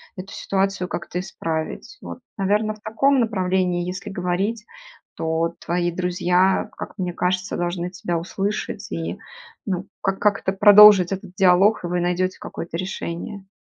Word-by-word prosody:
эту 190 +1 -8
ситуацию 195 -1 -1
как-то 180 0 -4
исправить. 165 - -5
Вот, - - -8 0.2
наверно, 210 +2 +1
в - - -20
таком 265 +6 +2
направлении 185 -5 0
если 185 +3 -5
говорить, 195 +4 -2 0.5
то 165 +1 -1
твои 175 0 0
друзья, 180 +1 +1
как - - -7
мне 180 -1 -1
кажется, 185 +3 -1
должны 175 0 -2
тебя 175 -2 -3
услышать 195 +4 -4
и, - - -4 0.5
ну, 190 -1 -3
как 195 -1 -1
как-то 200 -2 +1
продолжить 205 -2 +8
этот 190 -1 -5
диалог, 195 +2 +4
и - - -2
вы 175 0 -1
найдете 180 +1 0
какое-то 165 0 -6
решение. 185 +2 -5
185 Hz, 140 wpm, -22 LUFS, 175-200 Hz, 0.5 s, продолжить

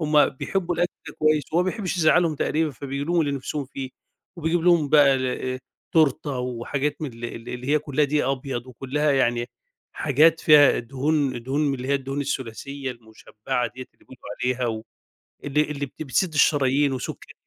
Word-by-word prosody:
هُم 150 -1 +4
بيحبّوا 175 +5 -2
الأكْل 175 - 0 0.3
كويس 155 -2 +3
وهو 175 +2 +3
ما 185 - 0
بيحبّش 195 -5 -3
يزعّلهم 165 0 +4
تقريبًا 155 +1 0
فبيجيب 140 +3 -5
لهم 175 -1 +3
اللي 145 -2 0
نِفسهم 140 +1 -3
فيه 135 -1 -6 0.5
وبيجيب 165 +1 0
لهم 170 -4 +4
بقى 145 -3 +6
الا 130 0 -2 0.3
تورتة 145 -3 +2
وحاجات 125 +5 -3
من 135 -5 -4
ال 115 +1 -10
ال 115 -1 -7
اللي 125 +1 -6
هي 150 +1 +4
كلّها 150 -1 +1
دَقِيق 145 -1 0
أبيض 130 -2 -3
وكلّها 135 +4 -1
يعني 120 -3 +1 0.5
حاجات 155 +3 +3
فيها 150 -3 +6
دهون 135 0 -1
دهون 135 +4 -1
من 145 -2 +1
اللي 130 0 -6
هي 140 - +2
الدهون 135 +1 -2
الثلاثية 135 +1 -4
المشبَّعة 115 +2 -4
ديّة 130 0 -8
اللي - - -27
بيقولوا 130 - -15 0.2
عليها 125 0 0
و 110 -1 -3 0.6
اللي 145 +1 +1
اللي 140 -1 -3
بت 155 - -8
بتسِد 155 +5 0
الشرايين 140 -1 +3
وسُكَّر 130 - -6
140 Hz, 175 wpm, -24 LUFS, 130-150 Hz, 0.6 s, بقى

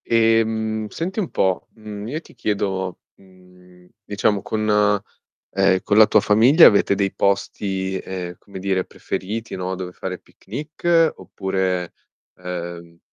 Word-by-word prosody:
Ehm, 110 -1 +1
senti 185 +6 -4
un 195 -6 0
po', 95 -1 0
mhmm, 105 -2 -8
io 155 +6 -4
ti - - -18
chiedo, 95 -5 -2 0.2
mhmm, 90 -1 -20 0.2
diciamo 100 0 0
con 110 +2 -2 0.8
ehm, 95 -1 +3
con 105 - +2
la 110 - +9
tua 110 - +4
famiglia 120 - +6
avete 100 -1 +3
dei 100 -1 0
posti, 95 -1 -1
ehm, 90 -2 -6
come 100 -1 -11
dire, 95 -1 -1
preferiti, 110 +4 -5
no, 95 0 -3
dove 90 -1 -6
fare 90 0 -5
picnic, 155 - 0
oppure, 95 -2 -2 0.5
ehm 85 -2 -7
100 Hz, 135 wpm, -21 LUFS, 95-110 Hz, 0.8 s, la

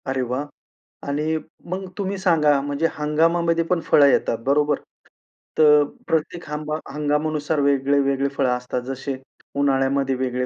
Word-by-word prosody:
अरे 130 0 -1
वाह! 125 +3 -2 0.6
आणि 150 +3 0 0.3
मग 190 +1 -4
तुम्ही 200 -1 -2
सांगा, 160 -6 +3
म्हणजे 145 +3 0
हंगामामध्ये 165 +2 +1
पण 180 - +2
फळं 145 - +5
येतात, 125 -3 +2
बरोबर? 145 +1 +2 0.8
तर 150 -1 +6 0.2
प्रत्येक 160 +2 -1
हंमा 150 0 -3 0.2
हंगामानुसार 150 +1 -1
वेगळे-वेगळे 140 0 +2
फळं 135 -2 +1
असतात. 125 0 -4
जसे 135 +1 -5 0.4
उन्हाळ्यामध्ये 135 -1 +1
वेगळे 125 0 -2
145 Hz, 125 wpm, -22 LUFS, 135-155 Hz, 0.8 s, तर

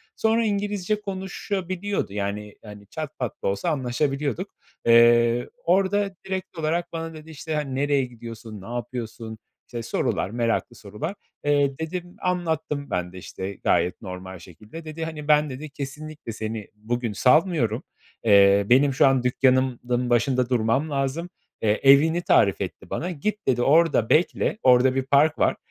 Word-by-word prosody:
Sonra 225 +1 +2
İngilizce 205 -1 -1
konuşabiliyordu 190 - -3
yani; 105 +1 -4
hani, 105 -2 -12
çat 155 +4 -6
pat 125 -5 -4
da - - 0
olsa 100 - -1
anlaşabiliyorduk. 135 -1 -1 0.4
Eee, 120 +1 +5
orada 195 +2 +2
direkt 190 -1 -5
olarak 165 +2 -1
bana 165 0 -4
dedi; 155 0 -12
işte 155 +1 -5
hani, 145 -3 -2
nereye 140 0 +1
gidiyorsun? 115 -3 -10
Ne 115 +5 -8
yapıyorsun? 115 -2 -6 0.3
işte 120 -1 -6
sorular, 95 - -1
meraklı 115 +1 -1
sorular. 110 - -6 0.3
Eee, 145 -2 +2
dedim 175 +2 -5
anlattım 160 -5 -2
ben 90 0 -2
de 95 - -10
işte 95 +2 -6
gayet 90 - +1
normal 95 -1 -8
şekilde. 105 - -12
Dedi 160 +1 -5
hani, 155 -2 -7
ben 150 0 +4
dedi, 140 +4 -7
kesinlikle, 145 -1 -7
seni 110 -1 -5
bugün 115 +1 -3
salmıyorum. 130 - +2 0.4
Eee, 100 -2 +6
benim 135 +3 +5
şu 130 - +5
an 135 -2 +2
dükkânımın 130 0 +2 0.3
başında 125 +1 +2
durmam 125 +5 +1
lazım. 140 +5 -2 0.3
Eee, 105 -1 +2
evini 150 +5 +6
tarif 100 - +3
etti - - -6
bana. 180 +3 -3
Git 210 +7 -3
dedi, 125 -2 +2
orada 145 -4 +3
bekle. 175 +5 +2
Orada 130 +1 +5
bir 135 - +1
park 145 +3 +3
var. - - +3
135 Hz, 150 wpm, -24 LUFS, 115-160 Hz, 0.4 s, Eee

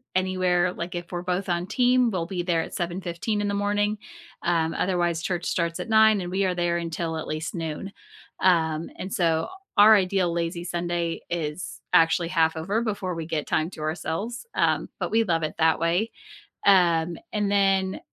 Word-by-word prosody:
anywhere, 185 -1 +1
like, 175 +1 -5
if 175 0 -6
we're 175 -1 -3
both 180 +1 -2
on 175 +1 -1
team, 250 +1 +3
we'll 180 -4 -2
be 175 0 -3
there 170 -2 +1
at - - -7
7:15 175 +4 -2
in 205 - -1
the 200 - -1
morning, 205 +1 0 0.5
um, 165 -2 +1
otherwise, 175 -3 0
church 175 -1 -2
starts 170 -1 -1
at - - -5
9 220 -2 +5
and 175 0 -5
we 195 +1 +1
are 185 -1 0
there 175 -1 0
until 165 -1 -3
at 160 - -5
least 155 +3 -4
noon. 165 +3 -4 0.5
Um, 160 -3 +2
and 185 - -6
so, 165 -7 +1 0.3
our 215 +2 +9
ideal 185 -2 +1
lazy 170 +1 -2
Sunday 175 -1 -2
is 165 0 -4
actually 165 +1 +4
half 160 -2 +2
over 195 +8 -1
before 200 -5 -2
we 165 -1 -4
get 155 -2 -3
time 155 +1 0
to 155 - -9
ourselves, 165 - -3
um, - - +1
but - - -2
we 225 +1 +3
love 165 -6 0
it 155 - -3
that 160 0 +3
way. 175 +7 +1 0.5
Um, 175 -4 +4 0.2
and 205 -2 0
then 195 -1 +2
175 Hz, 185 wpm, -25 LUFS, 165-195 Hz, 0.5 s, our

